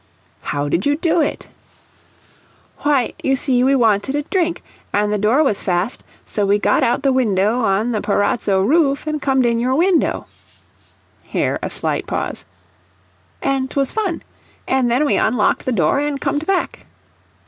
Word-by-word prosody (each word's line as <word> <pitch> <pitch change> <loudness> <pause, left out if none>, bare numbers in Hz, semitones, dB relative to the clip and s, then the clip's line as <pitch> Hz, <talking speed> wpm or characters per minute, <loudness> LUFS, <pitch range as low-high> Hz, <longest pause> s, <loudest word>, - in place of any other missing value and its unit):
"How 145 0 -2
did 170 - 0
you 285 - +2
do 330 +2 +1
it?" 295 - -3 1.3
"Why, 280 -5 +1
you 270 - +2
see 255 -2 +1
we 270 +1 +3
wanted 225 +1 +2
a 295 - -1
drink, 345 +1 -1 0.3
an' 210 0 +1
the 210 - 0
door 230 +9 +3
was 215 -9 0
fast, 180 +5 -1 0.2
so 210 - -2
we 200 +1 +3
got 205 0 +1
out 235 - +1
the 275 -1 +3
window 215 -2 +1
on 220 +1 +1
the 215 -3 -1
parazzo 205 -1 +1
roof, 285 - +2
an' 305 0 -1
comed 265 -2 +1
in 235 -1 +1
your 255 +2 0
window." 345 +2 +1 1.0
(Here - - -2
a - - -3
slight - - -3
pause.) - - -4 1.0
"An' 270 -1 0
'twas 275 0 0
fun. 405 -6 -2 0.4
An' 260 -2 +2
then 250 +5 +2
we 285 - +2
unlocked 220 -1 +1
the 255 - 0
door, 180 - +2
an' 290 -1 -1
comed 290 +2 -2
back." 390 -2 -2
255 Hz, 165 wpm, -19 LUFS, 210-290 Hz, 1.3 s, we